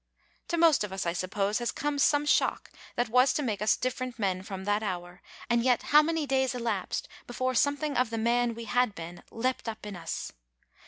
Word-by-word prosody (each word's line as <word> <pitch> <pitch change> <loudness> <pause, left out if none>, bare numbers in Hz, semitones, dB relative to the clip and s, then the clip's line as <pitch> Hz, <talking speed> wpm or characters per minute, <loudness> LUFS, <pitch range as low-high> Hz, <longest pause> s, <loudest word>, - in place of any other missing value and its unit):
To 340 - -1
most 325 -7 +5
of 210 - -5
us, 190 0 -3
I 170 - 0
suppose, 195 +4 -1
has 240 -1 -1
come 290 -1 -2
some 290 +1 +3
shock 295 - +1 0.2
that 245 - +1
was 250 +4 +4
to 300 - -1
make 210 -6 -2
us 215 - +3
different 255 -1 -3
men 190 -4 0
from 190 -1 -7
that 205 +2 +1
hour, 180 -3 -5 0.3
and 235 -1 +2
yet, 250 -1 +2
how 300 - +10
many 320 0 -1
days 265 -2 +1
elapsed 230 -6 -2 0.2
before 255 +1 -1
something 285 +3 +1
of 250 -2 +2
the 230 - -3
man 235 +1 +1
we 230 0 -7
had 245 -2 +1
been 170 0 -8
leapt 250 0 -2
up 220 -1 -7
in 205 -2 -6
us? 165 -2 -5
235 Hz, 210 wpm, -29 LUFS, 200-260 Hz, 0.3 s, how